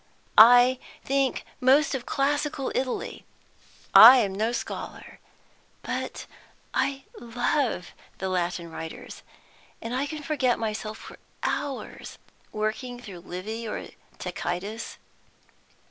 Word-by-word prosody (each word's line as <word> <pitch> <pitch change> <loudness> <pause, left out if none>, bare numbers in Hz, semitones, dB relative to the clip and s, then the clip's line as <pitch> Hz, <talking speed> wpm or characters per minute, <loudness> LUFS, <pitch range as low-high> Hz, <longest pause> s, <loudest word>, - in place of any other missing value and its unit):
I 245 +3 +8 0.2
think 275 -1 0
most 280 +3 +4
of 255 -3 -4
classical 285 0 -1
Italy. 255 -1 -3 0.7
I 245 +4 +11
am 205 -6 +1
no 220 +4 0
scholar, 240 - -6 0.6
but - - -4 0.5
I 270 0 0 0.2
love 240 - -1 0.3
the 190 - -3
Latin 175 -2 -2
writers, 160 0 -8 0.6
and 230 +1 -6 0.2
can 305 0 -6
forget 270 -5 +1
myself 215 -1 -4
for - - -12 0.3
hours, 280 -2 -4 0.3
working 220 +3 -3
through 200 -7 -10
Livy 205 +6 -6
or - - -5 0.3
Tacitus. 180 +5 -5
235 Hz, 100 wpm, -26 LUFS, 205-265 Hz, 0.7 s, I